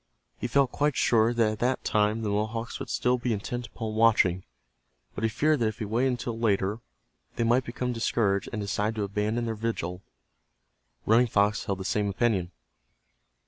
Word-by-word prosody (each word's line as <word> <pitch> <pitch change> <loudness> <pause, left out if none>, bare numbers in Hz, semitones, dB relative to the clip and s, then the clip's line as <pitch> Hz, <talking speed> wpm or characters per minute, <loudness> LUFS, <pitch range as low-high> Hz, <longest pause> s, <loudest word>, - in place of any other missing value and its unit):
He - - -2
felt 135 +1 +2
quite 145 -1 0
sure 115 0 +3
that 115 -2 +2
at 110 - -6
that 125 +2 0
time 105 +1 +1
the 105 - -1
Mohawks 110 +3 -2
would - - -6
still 125 0 +1
be 120 -1 -1
intent 120 +4 -4
upon 110 -2 -5
watching, 110 -5 +3 0.7
but - - -6
he 110 - +3
feared 150 +6 +2
that 115 - +2
if 110 0 -3
he 115 - -4
waited 120 +5 +1
until 120 -2 -3
later 105 -1 +1 0.6
they 120 - 0
might 120 +3 +2
become 125 +1 -3
discouraged 110 -4 0
and 110 - -3
decide 105 +2 -1
to 105 - -1
abandon 105 +4 -1
their 115 - -2
vigil. 105 -5 -3 1.0
Running 115 +3 +4
Fox 105 0 +1
held 100 -2 -2
the - - -6
same 105 0 0
opinion. 100 -4 0
110 Hz, 185 wpm, -27 LUFS, 105-120 Hz, 1.0 s, Running